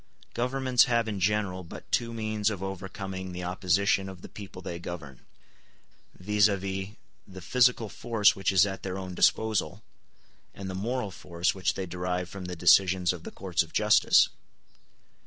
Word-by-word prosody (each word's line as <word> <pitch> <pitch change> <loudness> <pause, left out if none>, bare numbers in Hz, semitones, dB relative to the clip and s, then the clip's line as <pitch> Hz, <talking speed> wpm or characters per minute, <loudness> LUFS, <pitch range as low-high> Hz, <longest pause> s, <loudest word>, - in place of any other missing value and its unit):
Governments 125 +1 +2
have 115 -3 +1
in 105 -3 -3
general 95 -1 0
but 85 - -11
two 115 -1 +1
means 110 -2 -1
of 100 -3 -5
overcoming 95 -1 -6
the 90 0 -5
opposition 95 +2 +1
of 95 -2 -11
the - - -9
people 100 -3 -10
they 85 -1 -6
govern, 80 -7 -8 1.0
viz., 105 +2 +3
the 95 0 -3 0.4
physical 120 +4 +2
force 110 0 +2
which 95 0 0
is 95 0 +5
at 95 -1 -5
their 95 0 -4
own 95 -1 -6
disposal, 110 +3 +1 0.7
and 95 -1 -6
the - - -6
moral 110 +2 -2
force 85 -1 -2
which 95 -2 -1
they 95 - -3
derive 90 0 -3
from 95 -2 -8
the 90 0 -5
decisions 90 +1 +4
of 85 -2 -10
the - - -6
courts 90 -3 -1
of 80 - -6
justice. 105 0 +5
95 Hz, 160 wpm, -28 LUFS, 90-105 Hz, 1.0 s, is